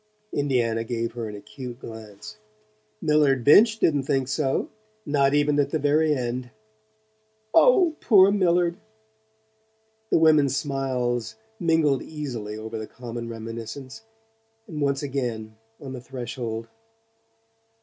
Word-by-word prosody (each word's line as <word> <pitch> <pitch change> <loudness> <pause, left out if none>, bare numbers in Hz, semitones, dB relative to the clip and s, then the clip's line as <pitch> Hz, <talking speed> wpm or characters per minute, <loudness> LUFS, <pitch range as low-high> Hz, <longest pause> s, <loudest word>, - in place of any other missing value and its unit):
Indiana 120 -5 0
gave 115 0 -3
her 115 -2 -5
an 105 - -7
acute 120 +4 -9
glance. 105 -3 -10 0.6
"Millard 150 -4 +3
Binch 215 - +6
didn't 145 -9 +2
think 135 -1 0
so 135 0 0 0.4
not 140 -1 +2
even 145 0 +2
at 140 -1 +2
the 160 - 0
very 150 +1 +2
end." 125 -1 -3 1.0
"Oh, 370 -10 +5
poor 200 -3 +6
Millard!" 175 -3 +2 1.3
The - - +4
women's 150 -4 +4
smiles 125 -5 -2 0.2
mingled 160 -6 +2
easily 120 -9 -6
over 110 +1 -6
the 110 - -6
common 120 -1 -7
reminiscence, 115 - -7 0.7
and 155 -6 -6
once 140 0 0
again, 120 -6 -3 0.2
on 135 -2 -8
the 125 - -7
threshold. 120 -2 -5
135 Hz, 120 wpm, -25 LUFS, 115-150 Hz, 1.3 s, Binch